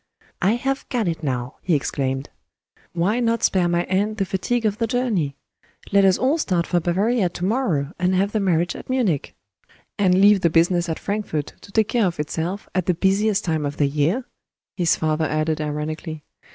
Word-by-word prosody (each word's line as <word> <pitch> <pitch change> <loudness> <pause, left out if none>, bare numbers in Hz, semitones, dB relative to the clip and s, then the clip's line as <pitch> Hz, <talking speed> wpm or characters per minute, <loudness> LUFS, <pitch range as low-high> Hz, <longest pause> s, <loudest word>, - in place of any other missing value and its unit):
"I 195 +4 +3
have 270 +3 -2
got 235 -6 0
it 165 -1 -2
now!" 130 -4 -3
he 175 - +1
exclaimed. 135 -1 -2 0.6
"Why 185 +7 +1
not 230 -1 0
spare 180 -2 +3
my 175 0 +1
aunt 205 +4 0
the 195 - 0
fatigue 220 +6 -1
of 210 0 0
the 230 - +1
journey? 215 - 0 0.6
Let 200 -1 +5
us 190 -1 +4
all 275 +6 +1
start 180 - 0
for 175 - +1
Bavaria 190 +4 +1
to 175 +1 -4
morrow, 185 - 0
and 185 +1 +2
have 195 +2 +1
the 215 - 0
marriage 175 -3 +1
at - - -10
Munich!" 230 - 0 0.6
"And 185 -2 +4
leave 200 0 +6
the 170 - +3
business 170 +1 +2
at 160 - -2
Frankfort 200 -8 -3
to 200 - -14
take 220 0 +2
care 230 -5 +2
of 170 -3 -4
itself, 165 +6 -3
at 185 -2 -1
the 180 - +2
busiest 195 +3 +1
time 160 -3 0
of 145 0 -3
the 145 - +3
year!" 155 - 0 0.5
his 170 -3 +2
father 155 0 0
added 155 +1 -1
ironically. 155 +1 -4
180 Hz, 190 wpm, -22 LUFS, 160-210 Hz, 0.6 s, leave